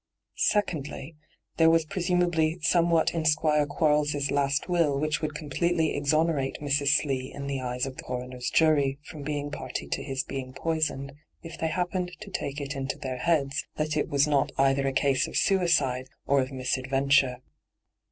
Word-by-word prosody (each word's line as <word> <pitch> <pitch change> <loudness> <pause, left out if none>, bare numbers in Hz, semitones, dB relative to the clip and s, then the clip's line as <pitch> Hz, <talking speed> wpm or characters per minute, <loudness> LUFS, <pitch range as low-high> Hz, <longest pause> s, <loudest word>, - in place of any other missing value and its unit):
Secondly, 155 -7 -1 0.4
there 160 -1 +6
was 165 -1 +3
presumably 175 -3 +1
somewhat 170 0 +3
in 165 -2 -1
Squire 150 -1 +2
Quarles' 150 -1 +1
last 140 +2 +1
will 165 -6 +2
which 155 +1 -1
would 155 -1 -3
completely 160 +2 0
ex 145 0 0
onerate 155 -4 +1
Mrs. 145 -1 0
Slee 135 -3 +1
in 140 - -7
the 140 -1 -3
eyes 125 0 -2
of 135 -1 -7
the - - -7
coroner's 125 0 -4
jury 145 -4 +3
from 155 -5 -9
being 145 0 -3
party 145 - -5
to - - -2
his 135 -1 -2
being 130 -1 -6
poisoned, 155 -4 -1 0.3
if 165 -1 -8
they 160 - -2
happened 180 +1 -2
to 205 -2 -9
take 140 -5 -3
it 140 0 -4
into 135 0 -3
their 130 -1 -4
heads 145 0 +1
that 155 0 -1
it 150 - 0
was 140 -2 +3
not 145 -2 +1
either 135 0 +2
a - - +1
case 135 0 +2
of - - -3
suicide 150 -9 +2 0.2
or 140 -1 +3
of 130 +1 -4
mis 130 -1 -5
hyGoo>^lc - - +3
ENTRAPPED 130 0 -7
49 135 0 +2 0.3
adventure. 125 - -8
145 Hz, 185 wpm, -27 LUFS, 135-160 Hz, 0.4 s, there